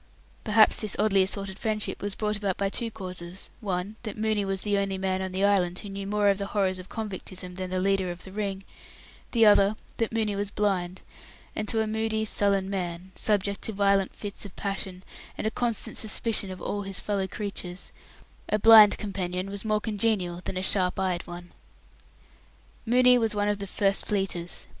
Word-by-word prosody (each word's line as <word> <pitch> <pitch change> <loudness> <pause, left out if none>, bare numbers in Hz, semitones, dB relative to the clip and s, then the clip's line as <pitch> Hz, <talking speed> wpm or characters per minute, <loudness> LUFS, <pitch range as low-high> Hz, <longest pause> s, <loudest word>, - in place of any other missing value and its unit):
Perhaps 215 0 +5
this 215 -2 -2
oddly 205 -2 +3
assorted 195 0 -1
friendship 215 -1 -2
was 205 -1 -1
brought 210 -1 -1
about 200 -3 -2
by 200 0 0
two 230 +3 -1
causes 185 -3 -7
one, 200 -1 -3
that 215 -3 -6
Mooney 215 -1 +1
was 195 -1 -3
the 205 -1 +1
only 195 -1 -1
man 190 0 -1
on 190 0 -3
the 190 +2 +1
island 180 -3 +2
who 205 - -7
knew 195 0 -5
more 205 0 +2
of 200 0 +2
the 200 - -3
horrors 190 -2 0
of 185 - -11
convictism 185 -4 -6
than 185 0 -4
the 185 0 -1
leader 195 -1 +1
of 175 0 -7
the 190 - -10
Ring; 195 -1 -3 0.7
the 230 -2 +5
other, 205 0 +6 0.2
that 230 - 0
Mooney 220 -2 0
was 200 0 -2
blind, 190 -3 -1 0.5
and, 215 - -2
to 225 +1 +2
a - - +1
moody, 220 0 -1
sullen 200 -2 +1
man, 180 -1 -4
subject 200 -1 0
to 220 - -4
violent 200 -1 +2
fits 205 -2 -6
of 200 -2 -9
passion 190 -2 -4 0.3
and - - -4
a 220 - +1
constant 235 -2 -1
suspicion 220 -2 +2
of 185 0 -7
all 205 +3 -3
his 195 -1 +1
fellow 200 -2 -1
creatures, 195 -3 -6 0.6
a 210 - +2
blind 215 -1 +8
companion 185 -2 -3
was 200 0 -3
more 215 -1 +1
congenial 210 -5 -1
than 185 - -3
a 185 - -2
sharp 185 -2 +1
eyed 185 -2 -1
one. 175 0 -9 1.4
Mooney 250 +1 +6
was 225 -2 0
one 205 0 +1
of 205 -1 -1
the 200 - -4
"First 195 +1 +1
Fleeters". 190 -4 -1
200 Hz, 195 wpm, -27 LUFS, 190-210 Hz, 1.4 s, blind